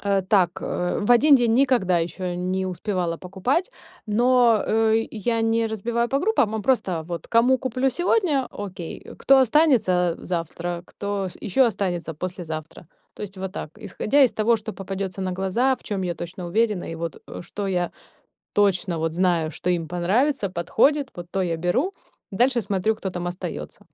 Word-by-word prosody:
э, 200 -1 +1
так, 185 -3 +2
э, 180 0 -2
в 205 - -1
1 280 +5 +7
день 240 -4 +3
никогда 240 -9 +3
ещё 175 +2 -3
не 185 +1 -2
успевала 180 -2 -2
покупать. 195 - -1 0.4
Но, 240 +1 +4
э, 225 0 +2
я 230 +1 -1
не 225 0 +2
разбиваю 235 +2 -1
по 275 - +1
группам, 290 - +2
а 220 - -2
просто 190 -9 +1
вот 170 -1 -5
кому 245 +3 +4
куплю 260 +1 0
сегодня, 345 - +1
окей, 185 -5 -7 0.2
кто 275 0 +5
останется- 230 - +3
завтра, 170 0 -4
кто, 200 -1 -3
ш 175 - -12
ещё 235 +6 +3
останется- 180 -7 -2
послезавтра. 160 -1 -6 0.3
То - - -9
есть 200 -1 -7
вот 190 0 -5
так. 150 - -6
Исходя 215 +7 +1
из 255 - +4
того, 230 +2 +2
что 215 0 -6
попадётся 195 -1 -5
на 185 -1 -2
глаза, 195 +8 +1
в - - -22
чём 200 -2 -3
я 175 -1 -2
точно 175 +2 -7
уверена, 210 0 +1
и - - -5
вот, 165 0 -6
э, - - -8
что 200 +3 -5
я 180 -2 0 0.6
точно 190 -4 +2
вот 160 0 -1
знаю, 170 -3 +1
что 180 - -4
им 170 -2 0
понравится, 200 - +1
подходит, 250 - +1
вот 175 -1 -8
то 195 - 0
я 170 -2 -1
беру, 180 - 0 0.4
дальше 245 +4 +2
смотрю, 205 +1 0
кто 200 -3 -4
там 175 -1 -4
остаётся. 175 +1 -6
195 Hz, 175 wpm, -24 LUFS, 180-235 Hz, 0.6 s, 1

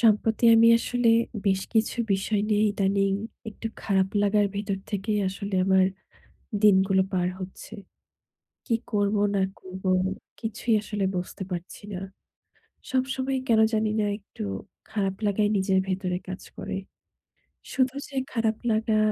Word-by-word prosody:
সম্প্রতি 220 0 +3
আমি 225 0 +7
আসলে 245 0 0 0.4
বেশ 190 -1 +3
কিছু 220 +1 +2 0.2
বিষয় 200 +2 0
নিয়ে 210 0 +3
ইদানীং 195 -1 +1 0.4
একটু 220 +1 -7 0.2
খারাপ 190 -2 +2
লাগার 205 0 +3
ভেতর 200 -1 -2
থেকেই 210 +1 -1
আসলে 200 +1 -5
আমার 190 0 +5 0.8
দিনগুলো 190 -2 +5
পার 180 -1 +1
হচ্ছে। 190 +3 -8 0.9
কী 235 - +2 0.2
করব 205 -1 +1 0.2
না 195 - +2 0.2
করব, 185 0 -10 0.6
কিছুই 225 +1 -1
আসলে 210 -1 -3
বুঝতে 180 +2 -4
পারছি 175 0 -6
না। 180 - -3 0.9
সবসময় 260 +1 0
কেন 225 -2 +4
জানি 220 0 +2
না 210 - +2
একটু 200 - -9 0.5
খারাপ 195 -3 -1
লাগাই 205 +1 +2
নিজের 190 0 +2
ভেতরে 185 -1 -1
কাজ 185 0 -6 0.2
করে। - - -4 1.0
শুধু 260 0 +2
যে 280 - -14 0.2
খারাপ 225 -2 +1
লাগা 220 0 +2
205 Hz, 130 wpm, -26 LUFS, 190-220 Hz, 1.0 s, আমি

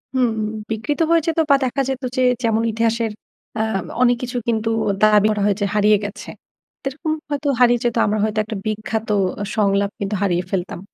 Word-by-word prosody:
হুম। 250 -2 +3 0.4
বিকৃত 225 +7 -2
হয়ে 335 0 +4
যেত 330 0 0
বা 280 - +7
দেখা 260 +2 -1
যেত 265 0 -3
যে 255 - +1 0.2
যেমন 225 0 +2
ইতিহাসের 230 0 0 0.5
অ্যাম 215 -4 -1 0.2
অনেক 245 -1 +4
কিছু 245 0 -3
কিন্তু 225 -1 0 0.3
দাবি 210 -1 +6
করা 210 - -1
হয় 205 -1 +2
যে - - +2
হারিয়ে 210 0 +4
গেছে। 210 +1 -7 0.5
সেরকম 300 +4 -3 0.2
হয়তো 290 0 -2
হারিয়ে 240 -1 +5
যেত। 240 -1 0
আমরা 210 +1 0
হয়তো 215 0 0
একটা 215 +1 -6
বিখ্যাত 215 +1 -3 0.5
সংলাপ 200 -2 +2
কিন্তু 200 +1 -2
হারিয়ে 180 -3 +1
ফেলতাম। 180 -2 -3
220 Hz, 175 wpm, -20 LUFS, 210-245 Hz, 0.5 s, বা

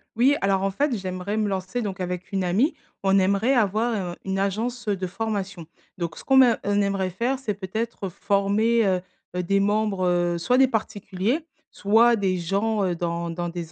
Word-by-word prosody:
Oui, 265 +5 +4
alors, 195 -1 +1
en 195 - +1
fait, 280 +4 0
j'aimerais 185 +2 -4
me 215 -1 +1
lancer 190 +4 -3
donc, 195 -3 -4
avec 180 +1 -4
une 190 -1 0
amie, 215 - +2 0.3
on 195 0 +4
aimerait 200 +7 +2
avoir, 215 -4 +1
heu, - - -10
une 195 0 -1
agence, 225 +5 -2
de 190 -2 -1
formation, 195 -4 -4 0.3
donc 170 -2 -4
ce - - -10
qu'on 265 -1 +3
me 245 -4 +7
on 205 0 +1
aimerait 195 -2 0
faire, 245 +8 -1
c'est 220 -6 -2
peut-être 200 +1 -4
former, 205 +4 +1
heu, 185 -2 +1 0.3
heu, 180 - -1
des 195 +3 +2
membres, 205 -2 +1
heu, 175 -1 +1
soit 250 +9 +1
des 265 0 +6
particuliers, 215 - -2 0.3
soit 230 +4 +4
des 190 -3 0
gens, 200 +4 0
heu, 180 -2 0
dans 170 0 -3
dans 175 +1 -3
des 170 -1 -6
200 Hz, 195 wpm, -24 LUFS, 185-225 Hz, 0.3 s, me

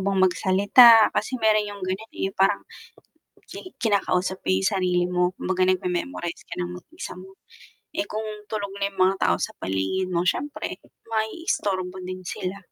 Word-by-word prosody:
bang 195 -1 +1
magsalita. 210 +5 +6
Kasi 255 - -1
meron 215 -1 +3
yung 205 -1 -8
ganyan, 195 +4 -4
eh, 195 - -2
parang 195 - +2 0.9
ki 370 - -10
kinakausap 190 -3 0
mo - - -3
yung 95 +1 +2
sarili 180 -2 +1
mo, 180 0 +1
kumbaga 185 0 0
nagme-memorize 180 0 -2
ka - - -7
ng 175 0 -3
mag-isa 320 - -9
mo, 190 +1 -14 0.6
eh 315 - 0
kung 215 +1 -3 0.3
tulog 205 -2 -3
na 200 0 0
yung 195 - -15
mga 190 +1 +4
tao - - +3
sa - - -3
paligid 95 - -1
mo 170 0 +1
siyempre 290 +9 -2 0.3
maiistorbo 210 - -2
din 185 0 -6
sila. 185 +2 -4
190 Hz, 160 wpm, -24 LUFS, 180-215 Hz, 0.9 s, magsalita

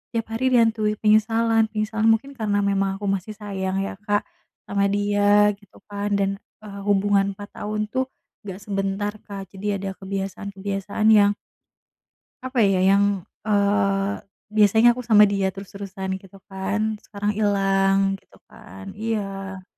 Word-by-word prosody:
tiap 225 - 0
hari 260 +3 +1
dihantui 220 -2 +3
penyesalan 225 +1 +3
penyesalan 220 +1 0
mungkin 225 +5 +2
karena 205 -2 0
memang 195 -1 0
aku 205 - -5
masih 195 +2 -2
sayang 195 -2 -3
ya 195 - -5
Kak 205 -1 +1 0.5
sama 200 0 +1
dia 205 0 +3
gitu 205 -2 -21
kan, 205 0 -2
dan, 195 0 0 0.3
eee, 200 -1 -8
hubungan 200 0 +2
4 205 0 -9
tahun 210 0 -2
tuh 260 0 0 0.4
gak 190 +1 -7
sebentar 195 +1 -2
Kak, 195 -1 -7
jadi 200 +1 -2
ada 195 -1 -3
kebiasaan-kebiasaan 195 +1 -4
yang 205 -1 +5 1.1
apa 260 -1 -4
ya? 190 -1 +2
Yang, 200 0 +3 0.2
eee, 200 -1 +2 0.4
biasanya 215 +2 +5
aku - - -3
sama 210 -2 +7
dia 195 -1 +1
terus-terusan 195 -1 -6
gitu 195 0 -17
kan, 205 +3 -2
sekarang 205 0 -3
hilang 195 -1 +2
gitu - - -24
kan, 95 +1 -11
iya. 195 -4 -4
200 Hz, 140 wpm, -23 LUFS, 195-215 Hz, 1.1 s, sama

